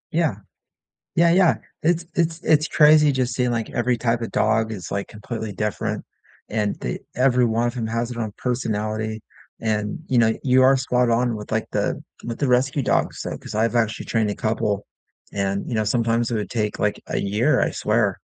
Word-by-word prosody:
Yeah. 160 - +1 0.8
Yeah, 170 0 +4
yeah. 180 -2 +5 0.3
It's 170 +1 +1
it's 165 -1 0
it's 155 0 +3
crazy 150 0 +6
just 130 -2 -1
seeing, 125 -1 +1
like, 115 -2 -2
every 120 0 0
type 120 0 0
of 115 - -3
dog 110 +1 +1
is, 95 -6 -7
like, 100 0 -3
completely 110 0 -6
different 105 +1 -2 0.5
and 105 -1 -1
the - - -3
every 125 0 +3
one 115 +1 +1
of 120 - -3
'em 115 -2 -2
has 115 +2 -2
it 120 - -6
own 110 -3 -3
personality. 110 -3 -2 0.4
And, 105 -2 -1
you 125 - +2
know, 110 -1 +4
you 130 -1 +5
are 135 +1 +6
spot 125 -2 +1
on 120 0 +1
with, 105 0 -8
like, 110 0 0
the - - -1 0.2
with 120 -1 -5
the 140 - 0
rescue 130 +3 +2
dogs, - - 0
so - - -4
'cause - - -10
I've 115 +2 +1
actually 110 -2 0
trained 110 -2 +1
a - - -2
couple 110 -3 -1 0.5
and, 100 0 -2
you 120 - -3
know, 110 -1 +1
sometimes 115 +1 +1
it - - -1
would 105 -2 -3
take, 105 -3 -2
like, 105 0 -1
a - - -1
year, 105 +4 +2
I - - +2
swear. - - 0
115 Hz, 200 wpm, -23 LUFS, 110-125 Hz, 0.8 s, crazy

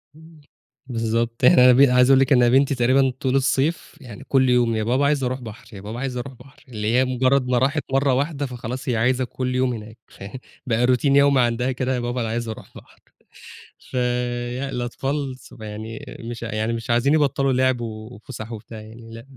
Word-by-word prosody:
إمم 160 -1 -17 0.5
بالضبط، 115 0 -2
إحنا 125 0 +7
بن 135 +1 +6
عايز 125 +1 +4
أقول 135 -1 +6
لِك 135 +1 +3
إن 125 -1 +5
أنا 120 - +4
بنتي 135 +1 +3
تقريبًا 130 +2 +3
طول 130 0 0
الصيف 140 +4 0
يعني 125 0 -11
كل 130 -2 +2
يوم، 120 -2 +2
يا 110 - -1
بابا 130 +5 +1
عايزة 140 -3 +1
أروح 130 +1 -4
بحر، 115 0 -10
يا 95 - -9
بابا 110 +4 -7
عايزة 130 -2 -3
أروح 130 +2 -7
بحر، 135 +3 -18
اللي 110 -1 -3
هي 130 +1 +3
مجرّد 130 +1 +1
ما 125 -1 +1
راحت 140 +4 +1
مرّة 135 -1 +2
واحدة 145 +1 -1
فخلاص 125 0 -6
هي 120 - +1
عايزة 130 +3 +1
كل 125 0 -4
يوم 130 -1 +1
هناك، 110 +1 -9
فيعني 105 +7 -10 0.2
بقى 120 0 +1
routine 125 +2 +1
يومي 140 -1 +5
عندها 120 +2 0
كده، 130 +1 -2
يا - - -2
بابا 120 +1 -3
أنا 115 - -2
عايزة 115 0 -3
أروح - - -11
بحر، - - -17 0.8
فيعني 125 +1 -3
الأطفال 135 +2 -3
صغ 110 - -14
يعني 110 +5 -7
مش 115 0 -7
ع 115 -2 -5
يعني 110 +2 -1
مش 115 +1 -6
عايزين 120 +5 +2
يبطّلوا 140 -3 +2
لِعب، 130 -1 +1
و 110 -1 -6
وفُسح 115 0 -9
وبتاع 110 0 -9
يعني، 115 +1 -13
لأ 115 +2 -10
125 Hz, 210 wpm, -22 LUFS, 115-135 Hz, 0.8 s, إحنا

